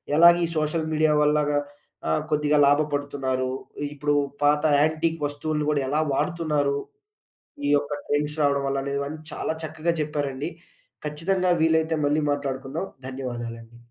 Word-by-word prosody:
ఎలాగ 170 +2 +8
ఈ - - -2
social 155 +1 0
media 155 0 +3
వల్లగా 150 -1 +3 0.5
ఆహ్, 80 - +2
కొద్దిగా 150 0 +2
లాభపడుతున్నారు? 145 -3 0 0.4
ఇప్పుడు 145 0 0 0.3
పాత 150 0 +4 0.2
యాంటిక్ 160 +2 +1
వస్తువులను 150 +1 -2
గూడా 145 -2 +1
ఎలా 150 +3 +1
వాడుతున్నారు? 150 -3 0 0.9
ఈ - - +1
యొక్క 145 +1 -2 0.2
ట్రెండ్స్ 150 +1 0
రావడం 140 -1 +2
వల్లనే, 135 0 -2
ఇవన్నీ 145 +2 -4
చాలా - - -2
చక్కగా 155 +2 -1
చెప్పారండి. 145 0 -2 0.6
ఖచ్చితంగా 180 +5 +1
వీలైతే 160 0 +3
మళ్ళీ 150 +2 +2
మాట్లాడుకుందాం. 140 +3 -3 0.2
ధన్యవాదాలండి. 120 -3 -6
150 Hz, 125 wpm, -25 LUFS, 140-155 Hz, 0.9 s, ఎలాగ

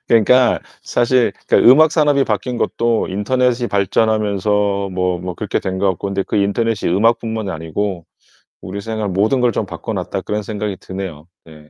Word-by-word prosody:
그러니까 120 +2 +4 0.2
사실 120 0 +1 0.2
그 - - +4
음악 150 +6 +6
산업이 145 -3 +3
바뀐 120 +3 -2
것도 115 -1 0
인터넷이 120 +4 0
발전하면서 100 -1 +1
뭐 90 -1 -1
뭐 90 0 -5
그렇게 - - -2
된 95 0 -3
것 100 +1 +2
같고 95 +2 -4
근데 100 0 -1
그 - - -3
인터넷이 105 0 0
음악뿐만이 110 0 0
아니고 85 +2 -4 0.6
우리 100 +2 -6
생활 110 -1 -3
모든 105 +8 +1
걸 125 -1 +3
좀 - - -2
바꿔놨다 - - -4
그런 105 0 -3
생각이 105 -1 -4
드네요. 95 -5 -7 0.2
네. 75 -2 -16
105 Hz, 360 characters per minute, -18 LUFS, 95-115 Hz, 0.6 s, 음악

